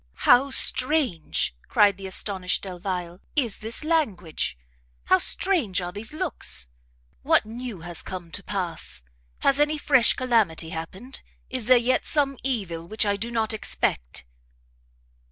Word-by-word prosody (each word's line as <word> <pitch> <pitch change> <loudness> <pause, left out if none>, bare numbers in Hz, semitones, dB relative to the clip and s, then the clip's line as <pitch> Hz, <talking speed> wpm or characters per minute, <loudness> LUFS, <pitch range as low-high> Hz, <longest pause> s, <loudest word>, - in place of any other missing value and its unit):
"How 265 +3 +6
strange," 255 - +1
cried 205 -2 +4
the 195 -1 -7
astonished 190 -1 -1
Delvile, 180 -2 -5 0.2
"is 245 -8 +1
this 225 +6 -2
language! 200 - -1 0.5
how 185 - +4
strange 320 - +3
are 175 -1 -4
these 205 +4 -4
looks! 300 - -1 0.5
What - - +4
new 230 -4 -7
has 175 0 -4
come 175 -3 -7
to 200 - -4
pass? 180 - -4 0.4
Has 275 +1 +3
any 300 +1 +2
fresh 265 -5 +4
calamity 220 -11 +1
happened? 190 +11 -7 0.3
Is 255 -3 0
there 255 0 +7
yet 245 +2 +1
some 275 -3 +2
evil 190 -11 -2
which 215 +3 0
I 205 0 +1
do 220 +4 -3
not 225 -2 -1
expect?" 60 - -2
210 Hz, 135 wpm, -25 LUFS, 180-255 Hz, 0.5 s, there